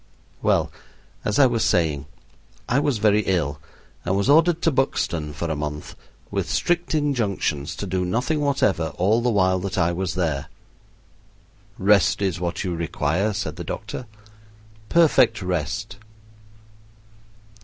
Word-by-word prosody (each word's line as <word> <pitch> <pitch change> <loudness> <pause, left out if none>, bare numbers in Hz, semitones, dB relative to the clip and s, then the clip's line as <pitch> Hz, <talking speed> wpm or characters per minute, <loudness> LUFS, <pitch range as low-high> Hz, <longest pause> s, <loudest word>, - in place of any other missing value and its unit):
Well, - - +2 0.5
as 105 - 0
I 140 - +7
was 120 -3 +1
saying, 75 -4 +1 0.6
I 125 - +2
was 145 -4 +1
very 105 0 +3
ill 75 -5 0 0.4
and 95 +2 0
was 100 +7 +2
ordered 165 +2 +4
to 165 - +3
Buxton 85 - -1
for 85 +3 -4
a 80 - -2
month, 75 0 -5 0.4
with - - -2
strict 175 -1 0
injunctions 105 - -1
to - - -5
do 95 -1 -1
nothing 125 - 0
whatever 100 - +1
all 105 +6 +2
the 120 - +1
while 95 -4 +2
that 95 0 -4
I 85 +1 +2
was 90 -1 -3
there. 80 -6 -1 1.3
"Rest 100 +1 +3
is 95 -4 -1
what 85 +2 -3
you 90 -3 -2
require," 85 +4 -1
said 95 -6 -4
the 85 - -5
doctor, 110 +7 -6 0.8
"perfect 135 -9 +4
rest." 85 -5 -3
95 Hz, 140 wpm, -23 LUFS, 85-120 Hz, 1.3 s, I